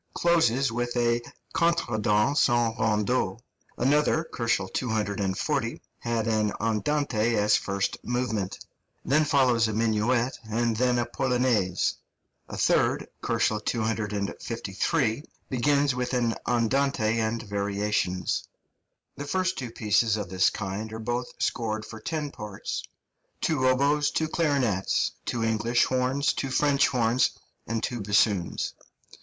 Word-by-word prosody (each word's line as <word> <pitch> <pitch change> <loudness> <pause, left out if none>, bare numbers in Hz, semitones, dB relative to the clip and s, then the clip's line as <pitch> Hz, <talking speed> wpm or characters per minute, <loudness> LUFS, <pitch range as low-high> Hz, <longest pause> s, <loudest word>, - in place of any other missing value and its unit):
closes 140 -7 +3
with 120 +1 -2
a 120 0 +2 0.3
contredanse 125 -6 +2
en 120 -1 +2
rondeau; 105 -2 +1 0.4
another 150 +5 +2
(240 110 -1 -1 0.6
K.) - - -20 0.2
has 115 -2 -1
an 110 -2 +1
andante 115 0 0
as 105 0 +4
first 100 0 -2
movement; 115 -6 -2 0.5
then 150 +3 +3
follows 130 -6 +3
a 110 - -2
minuet, 115 +3 +1
and 115 +1 0
then 125 0 +2
a 120 - +1
polonaise; 125 -9 +1 0.5
a - - -6
third - - +2
(253 110 - -1
K.) 115 +6 -2 0.2
begins 140 +2 +2
with 125 +1 -2
an 120 -2 +1
andante 115 -1 +1
and 110 +1 -1
variations. 100 -3 -1 0.7
The 145 - -5
two - - -9
first 185 +1 0 0.2
pieces 110 0 +2
of 100 -4 -4
this 95 0 +3
kind 105 +2 -5
are - - -4
both 120 +2 -3
scored 110 -2 -1
for 110 - -9
ten 150 +4 -3
parts, 105 -2 -5 0.6
two 140 -5 +1
oboes, 140 +3 +3
two 160 - 0
clarinets, 135 - +1 0.2
two 115 -2 -1
English 115 +2 +2
horns, 130 +2 +1
two 135 - -3
French 140 +1 +3
horns, 125 -1 +1 0.3
and 115 0 -2
two 120 -2 -2
bassoons. 100 -3 +1
115 Hz, 120 wpm, -27 LUFS, 105-130 Hz, 0.7 s, as